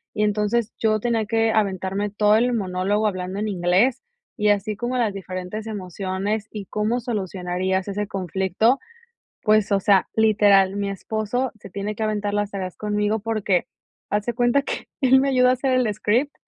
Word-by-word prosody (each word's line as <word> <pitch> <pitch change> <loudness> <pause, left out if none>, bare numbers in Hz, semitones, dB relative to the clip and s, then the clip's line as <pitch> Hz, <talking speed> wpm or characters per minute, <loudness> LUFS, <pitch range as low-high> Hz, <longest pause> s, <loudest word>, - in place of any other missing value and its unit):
Y 210 - +1
entonces 210 +2 0
yo 215 -1 +2
tenía 230 -1 0
que 225 0 +2
aventarme 200 -1 0
todo 210 +1 +3
el 245 +3 +3
monólogo 200 0 0
hablando 185 -1 -3
en 215 - -1
inglés, 190 +6 +2 0.4
y 210 -1 +2
así 205 +1 +1
como 240 +4 -2
las 225 -5 +1
diferentes 190 +3 -6
emociones 195 +1 -3
y 210 -2 -6
cómo 215 +5 -1
solucionarías 190 -4 -2
ese 205 +1 -3
conflicto. 190 - +1 0.6
Pues, 215 -1 +3
o 195 - +3
sea, 195 -2 +4
literal, 205 -3 +4
mi 200 -1 -1
esposo 220 +5 -2
se 195 - -11
tiene 200 +3 -4
que 220 - -3
aventar 210 -1 -1
las 205 0 -1
tareas 185 -2 -5
conmigo 210 +1 0
porque, 210 -4 0 0.4
haz 210 0 0
de 240 - -1
cuenta 245 +3 +2
que - - -5
él 265 0 +6
me 275 +1 +1
ayudó 250 -1 +4
a - - +5
hacer 260 +1 0
el 245 -5 +2
script, 245 +8 0
210 Hz, 175 wpm, -23 LUFS, 195-225 Hz, 0.6 s, él